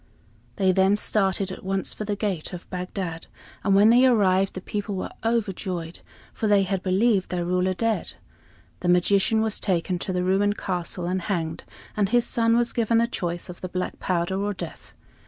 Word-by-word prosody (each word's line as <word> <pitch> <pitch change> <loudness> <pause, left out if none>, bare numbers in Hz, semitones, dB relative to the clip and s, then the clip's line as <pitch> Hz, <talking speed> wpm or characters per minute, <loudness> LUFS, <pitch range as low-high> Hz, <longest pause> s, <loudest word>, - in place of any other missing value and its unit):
They 190 -1 +3
then 190 +2 +4
started 195 -2 0
at - - -8
once 195 0 -2
for 215 - -5
the 205 0 -1
gate 195 -6 -3
of 180 - -8
Bagdad; 180 -2 -4 0.4
and 195 -1 +3
when 210 +3 +6
they 250 +2 +6
arrived, 195 -5 +3
the - - -3
people 205 +2 -4
were 185 - -4
overjoyed, 190 -7 -2 0.3
for 220 - -2
they 205 -1 +4
had 190 -1 -1
believed 195 +1 +2
their 175 -1 -2
ruler 180 +1 +1
dead. 225 +3 -1 0.7
The 180 - -1
magician 195 +5 +3
was 220 -1 0
taken 180 -1 0
to 190 - -3
the 180 -1 0
ruined 200 +3 +2
castle 180 -1 -3
and 185 +1 -1
hanged, 165 -4 -3 0.3
and 205 -2 +1
his 240 0 +3
son 230 0 +2
was 240 0 +1
given 230 -1 +2
the 230 - +4
choice 175 -7 -4
of 180 - -10
the 185 - -5
black 180 0 -4
powder 185 +2 -1
or 205 0 -1
death. - - -8
190 Hz, 190 wpm, -25 LUFS, 180-210 Hz, 0.7 s, when